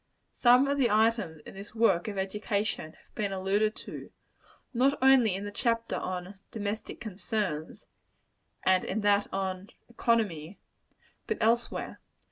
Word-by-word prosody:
Some 250 +2 +5
of 280 0 0
the 250 - +4
items 210 -7 +2
in - - -10
this 200 +3 -11
work 220 -6 +3
of 205 -2 -4
education 200 -3 -2
have - - -26
been 205 -2 -2
alluded 200 +3 +1
to - - -8 0.6
not 265 +4 +3
only 260 -7 +5
in 195 +2 -5
the 205 - -5
chapter 230 +2 0
on 185 +1 -5
"Domestic 210 0 -4
Concerns;" 200 -6 -4 0.8
and 185 -1 +3
in 215 +3 -2
that 205 0 +2
on 190 0 -3 0.2
"Economy," 205 -8 0 0.7
but 445 - -1
elsewhere. 235 +2 0
205 Hz, 135 wpm, -29 LUFS, 190-230 Hz, 0.8 s, Some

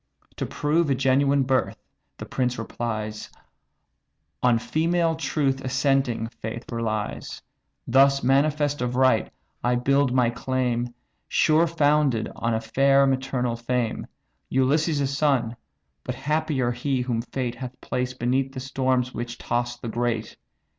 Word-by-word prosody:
"To - - -2
prove 155 +2 +1
a 135 - +3
genuine 135 +1 +3
birth 130 0 0 0.4
(the - - -7
prince 125 -1 -1
replies) 110 -2 -4 1.1
On 125 -2 +4
female 165 +6 +1
truth 140 -4 0
assenting 135 -3 +1
faith 115 +1 -7
relies. 110 -3 -3 0.5
Thus 140 +2 +4
manifest 145 +2 +2
of 125 0 -1
right, 130 -3 +3 0.3
I 125 0 +2
build 140 +2 +2
my 125 -2 +3
claim 125 -1 -1 0.4
Sure 160 +2 +3
founded 145 -7 +2
on 115 0 -1
a 110 - -1
fair 135 +4 +3
maternal 130 -2 0
fame, 120 0 -2 0.4
Ulysses' 140 +1 +1
son: 135 -5 +1 0.5
but 125 - -4
happier 140 -2 0
he, 125 +2 -1
whom 120 -2 -1
fate 125 0 -3
Hath 125 +1 -8
placed 125 0 -3
beneath 130 +2 0
the 130 - -5
storms 130 -1 0
which 120 +1 -5
toss 120 0 -2
the 120 - -7
great! 115 -1 -2
130 Hz, 130 wpm, -25 LUFS, 120-140 Hz, 1.1 s, On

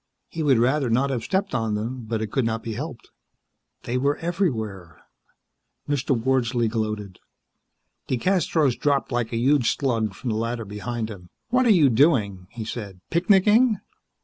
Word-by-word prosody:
He 165 - -5
would 140 -5 +4
rather 130 +3 +2
not 130 +4 +2
have 120 -4 -2
stepped 195 - -1
on 115 -3 0
them, 115 +3 -4
but 110 0 -2
it 110 - -5
could 135 - +1
not 115 0 -2
be 115 - -4
helped. 135 +2 -7 0.7
They 125 +2 -1
were 140 +2 +1
everywhere. 110 - -3 0.9
Mr. 135 -3 0
Wordsley 120 -1 +1
gloated. 110 -4 -3 0.9
DeCastros 155 -1 +1
dropped 140 -2 +1
like 120 -2 -1
a 115 - -1
huge 130 0 +2
slug 115 -7 -1
from 125 - -4
the 110 - -1
ladder 115 0 -2
behind 110 +2 -4
him. 90 -4 -11 0.2
"What 250 +1 +3
are - - +4
you 170 -9 +6
doing?" 110 - +2
he 115 -1 -7
said. 105 -4 -6
"Picnicking?" 205 +5 +4
120 Hz, 160 wpm, -24 LUFS, 110-145 Hz, 0.9 s, you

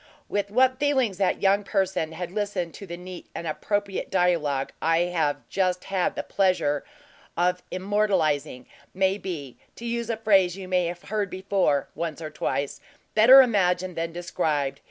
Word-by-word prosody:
With 200 -1 -1
what 255 +4 +3
feelings 260 -9 +1
that 195 0 +1
young 200 +1 +4
person 190 -5 -1
had 175 +1 -5
listened 200 -4 -2
to 200 - -10
the 170 0 -6
neat 180 0 -9
and 170 - -5
appropriate 200 +5 -2
dialogue 165 -7 +1
I 165 +1 +3
have 165 -4 -1
just 185 -2 0
had 190 -2 -1
the - - -3
pleasure 180 -7 +1 0.5
of 180 +1 +1
immortalizing, 185 - 0 0.3
may 190 +1 +1
be 150 -10 -6 0.2
to 235 - -9
use 235 0 -2
a 230 - -1
phrase 195 -5 +3
you 190 -1 -7
may 180 -2 +1
have 175 +2 -6
heard 210 -2 -1
before, 185 -7 0
once 165 -2 -4
or 155 -2 -6
twice 140 0 -2 0.3
better 255 +5 +9
imagined 185 -6 +1
than 165 0 -2
described. 155 -5 -2
185 Hz, 160 wpm, -25 LUFS, 165-200 Hz, 0.5 s, better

